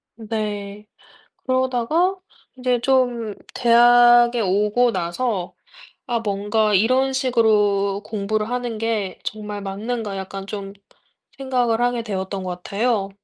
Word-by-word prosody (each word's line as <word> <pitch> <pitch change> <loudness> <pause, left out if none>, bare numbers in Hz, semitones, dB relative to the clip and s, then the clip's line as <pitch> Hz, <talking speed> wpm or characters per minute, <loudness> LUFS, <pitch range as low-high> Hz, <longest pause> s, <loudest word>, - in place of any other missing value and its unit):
네. 210 -2 -5 0.6
그러다가 260 +8 +1 0.4
이제 250 -1 +1
좀 245 -5 +1 0.2
대학에 240 0 +5
오고 210 +4 +2
나서 180 +2 -2 0.5
'아 235 -1 -1
뭔가 210 +1 0
이런 255 +7 +3
식으로 210 -6 +2
공부를 215 +1 -2
하는 245 -3 -3
게 215 -4 -2
정말 210 -1 -5
맞는가.' 205 +2 -4
약간 195 0 -6
좀 200 -1 -6 0.7
생각을 250 -4 0
하게 245 -1 0
되었던 195 -3 -4
것 180 -1 -6
같아요. 210 -1 -1
220 Hz, 220 characters per minute, -21 LUFS, 200-245 Hz, 0.7 s, 대학에